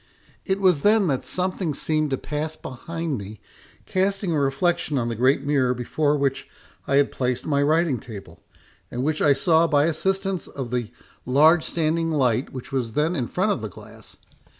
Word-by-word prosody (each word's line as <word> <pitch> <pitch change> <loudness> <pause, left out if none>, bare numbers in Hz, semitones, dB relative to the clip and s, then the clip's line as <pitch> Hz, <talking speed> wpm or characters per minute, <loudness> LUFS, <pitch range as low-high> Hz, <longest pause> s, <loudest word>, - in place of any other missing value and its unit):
It 190 0 0
was 180 -7 +3
then 210 +2 +4
that 135 -3 -2
something 180 -4 -2
seemed 155 0 0
to 135 - -1
pass 155 +3 -4
behind 160 +1 -5
me, 100 +1 -9 0.5
casting 195 0 0
a 155 - +1
reflection 150 +2 0
on 120 -2 -1
the 115 - -3
great 130 +4 +2
mirror 135 -3 +1
before 145 +5 0
which 140 -1 -1 0.4
I 135 - +1
had 140 0 +3
placed 125 -1 -2
my 140 -2 +1
writing 155 -2 +2
table, 100 -7 -11 0.5
and 125 - -3
which 155 +2 0
I 145 - +5
saw 160 +4 +3
by 145 -3 +3
assistance 190 +3 -1
of 130 -4 -6
the 120 -3 -2 0.3
large 155 +6 +4
standing 165 0 0
light 130 -5 +1
which 130 -2 -8
was 125 -5 -2
then 155 +6 +1
in 125 -6 -2
front 190 +4 0
of 130 - -2
the 110 - -4
glass. - - -13
145 Hz, 180 wpm, -23 LUFS, 130-165 Hz, 0.5 s, I